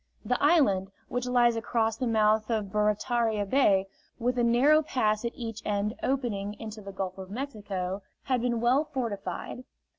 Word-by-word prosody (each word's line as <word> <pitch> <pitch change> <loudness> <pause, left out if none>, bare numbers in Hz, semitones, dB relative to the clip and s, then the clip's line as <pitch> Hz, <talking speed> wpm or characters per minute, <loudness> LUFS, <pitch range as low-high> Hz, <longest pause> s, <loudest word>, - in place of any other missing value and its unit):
The 250 - 0
island, 235 - +3 0.2
which 245 0 -2
lies 240 -1 +4
across 225 -1 0
the 250 +2 -2
mouth 215 -1 +2
of 215 -4 -1
Barataria 210 +1 +1
Bay, 195 -4 +3 0.3
with 245 +1 0
a - - +3
narrow 265 +7 +5
pass 215 -7 0
at 235 - -1
each 225 -2 -6
end 205 +1 -1
opening, 210 -7 -1
into 220 -1 -7
the 200 -1 -8
Gulf 190 -1 -4
of 190 -1 -8
Mexico, 205 -6 -4 0.2
had 255 -3 0
been 240 -1 0
well 250 +5 +3
fortified. 230 - -4
225 Hz, 160 wpm, -28 LUFS, 205-245 Hz, 0.3 s, narrow